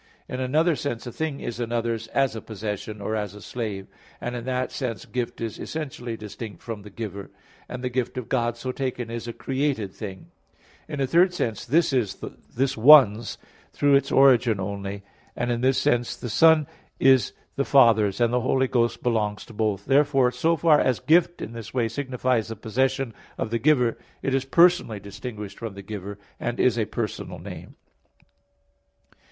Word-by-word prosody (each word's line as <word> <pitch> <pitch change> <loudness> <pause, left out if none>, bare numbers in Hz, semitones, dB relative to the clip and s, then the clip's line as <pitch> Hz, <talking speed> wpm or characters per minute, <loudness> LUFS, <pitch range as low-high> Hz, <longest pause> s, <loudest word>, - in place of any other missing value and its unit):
In 125 - -5
another 155 +6 +2
sense, 120 -5 -4
a 120 - -5
thing 155 +1 -3
is 120 0 -5
another's 115 -1 -2
as 135 0 +1
a 110 - -5
possession, 105 0 -5
or 110 +2 -2
as 105 -2 -3
a - - -10
slave; 105 -3 -5 0.3
and 120 0 -4
in 120 -1 -5
that 130 0 -1
sense 115 -7 -4
gift 125 -2 -4
is 115 -2 -4
essentially 130 -7 -5
distinct 105 0 -8
from 115 -3 -6
the 105 - -11
giver; 100 -1 -6 0.4
and 125 0 -6
the 125 - 0
gift 125 0 -2
of 125 - -4
God 120 -2 0
so 130 +2 -3
taken 125 -3 -3
is 115 0 -5
a - - -3
created 130 -6 -2
thing. 95 -4 -8 0.6
In 150 -3 -4
a - - +3
third 175 +6 +3
sense 115 - -2
"this 150 +4 +2
is 120 -7 +1 0.4
this 130 +2 +1
one's" 120 -3 +6 0.4
through 145 -1 +3
its 140 0 +3
origin 125 -6 +5
only; 100 +1 -4 0.3
and 120 0 -1
in 120 0 -1
this 130 +1 +3
sense 120 -2 +1
the 120 - -6
Son 155 +5 +5 0.3
is 130 -5 +4 0.2
the 140 - +1
Father's; 110 -8 +4
and 120 0 +2
the 125 - +2
Holy 130 +1 +2
Ghost 120 -2 0
belongs 105 -4 0
to 120 - -13
both. 105 -2 -1
Therefore, 135 -2 +3
so 160 +7 +1
far 155 -1 +4
as 130 -3 +1
gift 175 +2 +3
in 115 - -7
this 115 +1 -9
way 120 -3 +2
signifies 125 -1 -1
the 115 - -5
possession 130 +3 -1 0.2
of 110 - -3
the 115 - 0
giver, 125 -4 +3 0.2
it 135 - 0
is 135 0 +1
personally 170 - +4
distinguished 105 0 -8
from 115 -4 -6
the 100 - -9
giver, 100 0 -6 0.2
and 120 0 -3
is 120 -2 +3
a 110 - +1
personal - - -4
name. - - -9
120 Hz, 185 wpm, -25 LUFS, 110-135 Hz, 0.6 s, one's